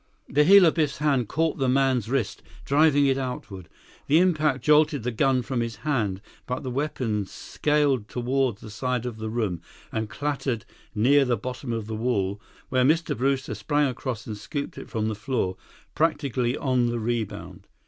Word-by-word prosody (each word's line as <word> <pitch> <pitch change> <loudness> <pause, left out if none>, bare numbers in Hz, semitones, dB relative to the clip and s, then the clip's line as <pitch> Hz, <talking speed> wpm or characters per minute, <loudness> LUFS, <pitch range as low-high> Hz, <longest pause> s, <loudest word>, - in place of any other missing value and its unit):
The 150 +2 +3
heel 195 +1 +8
of 160 - +4
Biff's 155 -4 0
hand 140 -6 +1
caught 160 -2 0
the 135 -1 +2
man's 130 -4 +2
wrist, 130 -6 -1 0.2
driving 145 0 +4
it 135 0 +2
outward. 100 -8 -6 0.4
The 150 - +5
impact 155 -6 +2
jolted 150 -3 +4
the 125 - -1
gun 130 +1 +2
from 125 0 -2
his 115 -1 -3
hand, 105 -10 0 0.3
but 125 +3 -3
the 130 - -4
weapon 120 -7 -2
scaled 145 - 0
toward 125 -1 0
the 105 - -11
side 125 +3 -2
of 120 -3 -5
the 110 0 -4
room 110 -7 -2 0.3
and 110 -1 -2
clattered 135 -6 -2 0.3
near 135 +7 +5
the 125 -3 +1
bottom 125 +3 -5
of 115 -2 -3
the 110 - -6
wall, 105 -3 -1 0.3
where 130 -1 +2
Mr. 160 +5 +2
Brewster 135 +2 0
sprang 145 -1 +1
across 125 -2 -5
and 110 - -5
scooped 140 +7 -5
it - - -9
from 110 -3 -1
the 110 - -1
floor, 105 -3 -2 0.4
practically 140 -6 0
on 130 -3 +1
the 120 0 -1
rebound. 115 -1 -4
130 Hz, 180 wpm, -25 LUFS, 115-145 Hz, 0.4 s, heel